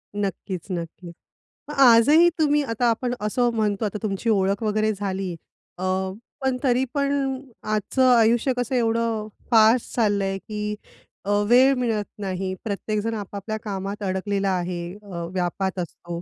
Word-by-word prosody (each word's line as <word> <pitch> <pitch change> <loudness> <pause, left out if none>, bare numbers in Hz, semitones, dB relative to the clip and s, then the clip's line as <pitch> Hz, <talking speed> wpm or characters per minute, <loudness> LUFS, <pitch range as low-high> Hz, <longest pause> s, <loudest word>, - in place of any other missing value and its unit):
नक्कीच, 195 -2 -3
नक्की. 170 0 -6 0.7
आजही 275 +7 +7
तुम्ही 295 -1 +3
आता 240 -1 0
आपण 245 +2 -1
असं 240 +3 +1
म्हणतो, 215 -2 0
आता 210 0 -3
तुमची 210 +2 -1
ओळख 200 0 +1
वगैरे 215 0 +1
झाली 195 -2 -3 0.5
अ, 180 - -6 0.6
पण 265 -1 0
तरी 255 -1 +3
पण 280 -2 0 0.2
आजचं 215 +5 0
आयुष्य 235 +3 +3
कसं 245 +1 -1
एवढं 230 -2 0 0.2
फास्ट 225 +1 +4
चाललंय 200 -4 +1
की 210 +1 -4 0.5
अ, - - -4 0.2
वेळ 260 +3 +6
मिळत 225 -5 -1
नाही. 190 -1 -3
प्रत्येकजण 215 +1 -2
आपापल्या 205 +1 -5
कामात 200 0 -4
अडकलेला 195 +1 -1
आहे 175 -1 -3 0.2
अ, 175 -4 -6
व्यापात 185 +1 -2
असतो 170 0 -6
210 Hz, 135 wpm, -24 LUFS, 195-235 Hz, 0.7 s, आजही